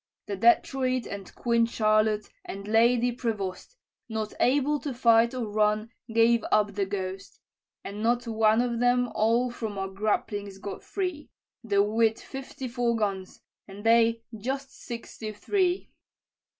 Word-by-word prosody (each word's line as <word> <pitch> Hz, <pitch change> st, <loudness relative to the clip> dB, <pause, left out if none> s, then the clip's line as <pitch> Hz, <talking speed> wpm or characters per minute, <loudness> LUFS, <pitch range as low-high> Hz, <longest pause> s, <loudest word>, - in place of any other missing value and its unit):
"The 200 Hz, -, -3 dB
Detroit, 255 Hz, +3 st, +2 dB
and 200 Hz, -2 st, -8 dB
Queen 235 Hz, -1 st, +2 dB
Charlotte, 215 Hz, -2 st, +2 dB, 0.2 s
and 200 Hz, +1 st, -7 dB
Lady 235 Hz, +2 st, +4 dB
Prevost, 220 Hz, -, -4 dB, 0.3 s
Not 220 Hz, -1 st, -3 dB
able 290 Hz, +3 st, +2 dB
to 280 Hz, -4 st, -5 dB
fight 235 Hz, 0 st, +4 dB
or 250 Hz, -2 st, -2 dB
run, 215 Hz, +1 st, +1 dB, 0.2 s
gave 230 Hz, 0 st, +4 dB
up 205 Hz, -1 st, +3 dB
the 200 Hz, -1 st, -1 dB
ghost: 190 Hz, -1 st, -5 dB, 0.4 s
And 205 Hz, +2 st, -6 dB
not 240 Hz, +2 st, +1 dB
one 220 Hz, 0 st, +3 dB
of 240 Hz, -1 st, -1 dB
them 245 Hz, 0 st, +3 dB
all 235 Hz, +3 st, +2 dB
from 220 Hz, -4 st, -5 dB
our 195 Hz, 0 st, -3 dB
grapplings 205 Hz, 0 st, -2 dB
got 200 Hz, 0 st, -6 dB
free, 360 Hz, -6 st, -4 dB, 0.3 s
Though 200 Hz, -3 st, +3 dB
we'd 220 Hz, +1 st, +2 dB
fifty 270 Hz, -1 st, -7 dB
four 240 Hz, -1 st, 0 dB
guns, 195 Hz, -4 st, -3 dB, 0.3 s
and 200 Hz, +1 st, -10 dB
they 230 Hz, 0 st, +4 dB
just 265 Hz, +5 st, -4 dB
sixty 230 Hz, -3 st, -7 dB
three. 365 Hz, -, 0 dB
225 Hz, 140 wpm, -27 LUFS, 210-245 Hz, 0.4 s, Lady